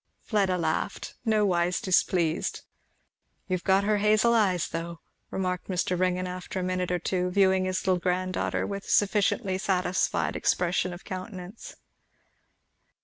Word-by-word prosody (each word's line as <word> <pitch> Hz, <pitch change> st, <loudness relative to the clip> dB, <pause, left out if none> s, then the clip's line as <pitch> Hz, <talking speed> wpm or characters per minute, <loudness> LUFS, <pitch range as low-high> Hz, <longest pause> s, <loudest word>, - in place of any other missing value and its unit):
Fleda 195 Hz, -4 st, +1 dB
laughed, 165 Hz, +4 st, -2 dB
nowise 185 Hz, -5 st, +2 dB
displeased. 175 Hz, -3 st, +1 dB, 0.9 s
"You've 185 Hz, -2 st, -2 dB
got 195 Hz, 0 st, +3 dB
her 210 Hz, 0 st, +2 dB
hazel 215 Hz, +3 st, +4 dB
eyes 190 Hz, -7 st, +2 dB
though," 165 Hz, 0 st, -5 dB, 0.3 s
remarked 180 Hz, -1 st, -2 dB
Mr. 185 Hz, -1 st, 0 dB
Ringgan, 185 Hz, 0 st, 0 dB
after 180 Hz, +1 st, -5 dB
a -, -, -2 dB
minute 185 Hz, 0 st, -1 dB
or 180 Hz, -, +2 dB
two, 180 Hz, +1 st, -1 dB
viewing 190 Hz, 0 st, +3 dB
his 185 Hz, 0 st, -2 dB
little 185 Hz, -1 st, +2 dB
granddaughter 185 Hz, +1 st, -1 dB
with 200 Hz, 0 st, -5 dB
a -, -, -11 dB
sufficiently 200 Hz, -1 st, +2 dB
satisfied 185 Hz, -1 st, 0 dB
expression 180 Hz, +1 st, +1 dB
of 175 Hz, +1 st, -10 dB
countenance. 185 Hz, +2 st, -8 dB
185 Hz, 135 wpm, -27 LUFS, 180-195 Hz, 0.9 s, hazel